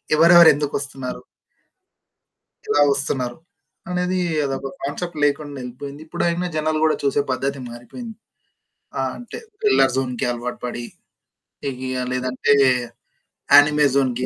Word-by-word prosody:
ఎవరెవరు 170 Hz, +1 st, +8 dB
ఎందుకొస్తున్నారు? 140 Hz, -3 st, -4 dB, 1.4 s
ఎలా 145 Hz, -, +2 dB
వస్తున్నారు 135 Hz, -3 st, -2 dB, 0.5 s
అనేది 180 Hz, +1 st, -1 dB, 0.3 s
అదొక 135 Hz, 0 st, -3 dB
కాన్సెప్ట్ 155 Hz, +4 st, -4 dB
లేకుండా 145 Hz, 0 st, 0 dB
వెళ్లిపోయింది. 140 Hz, +4 st, -8 dB
ఇప్పుడైనా 175 Hz, +2 st, -1 dB
జనాలు 155 Hz, 0 st, 0 dB
కూడా 155 Hz, -, +3 dB
చూసే 140 Hz, +1 st, +2 dB
పద్ధతి 140 Hz, +1 st, -2 dB
మారిపోయింది. 220 Hz, -, -9 dB, 0.8 s
ఆ! -, -, +1 dB, 0.2 s
అంటే 245 Hz, -, -9 dB, 0.2 s
థ్రిల్లర్ 400 Hz, -, +4 dB
జోన్‌కి 125 Hz, -2 st, -1 dB
అలవాటు 120 Hz, +1 st, -5 dB
పడి, 120 Hz, -1 st, -5 dB, 0.8 s
హెవిగా 130 Hz, -1 st, -3 dB
లేదంటే 130 Hz, +2 st, 0 dB, 1.0 s
యానిమే 150 Hz, +1 st, +7 dB
జోన్‌కి 130 Hz, -2 st, +1 dB
140 Hz, 105 wpm, -21 LUFS, 130-155 Hz, 1.4 s, ఎవరెవరు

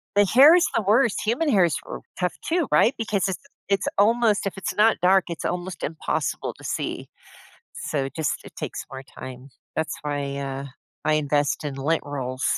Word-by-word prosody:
The 205 Hz, 0 st, +6 dB
hair 275 Hz, -, +8 dB
is 355 Hz, -, +4 dB
the 225 Hz, -, +3 dB
worst. 220 Hz, +3 st, +3 dB
Human 265 Hz, +8 st, +1 dB
hair 190 Hz, -7 st, +5 dB
is 165 Hz, -, 0 dB
r -, -, -6 dB, 0.2 s
tough 180 Hz, -1 st, 0 dB
too, 335 Hz, -3 st, +1 dB
right? 240 Hz, -, +5 dB
Because 210 Hz, -4 st, 0 dB
it's 190 Hz, +7 st, -4 dB, 0.3 s
it's 195 Hz, -, +1 dB
almost 220 Hz, 0 st, +3 dB
if 195 Hz, -, -5 dB
it's 190 Hz, -, -3 dB
not 220 Hz, +1 st, +4 dB
dark, 185 Hz, +1 st, +4 dB
it's 170 Hz, -, -5 dB
almost 180 Hz, +1 st, -3 dB
impossible 160 Hz, +2 st, -2 dB
to -, -, -15 dB
see. -, -, -3 dB, 0.7 s
So 135 Hz, -3 st, -2 dB
just 150 Hz, +2 st, -2 dB
it -, -, -13 dB
takes -, -, -5 dB
more 135 Hz, 0 st, -7 dB, 0.2 s
time. 130 Hz, +1 st, -9 dB, 0.3 s
That's 160 Hz, 0 st, -1 dB
why, 145 Hz, -1 st, -3 dB
uh, 135 Hz, 0 st, -4 dB, 0.4 s
I 155 Hz, -, +3 dB
invest 145 Hz, 0 st, +1 dB
in 145 Hz, -2 st, -3 dB
lint 150 Hz, +4 st, 0 dB
rolls. 130 Hz, -3 st, -4 dB
175 Hz, 185 wpm, -24 LUFS, 145-210 Hz, 0.7 s, hair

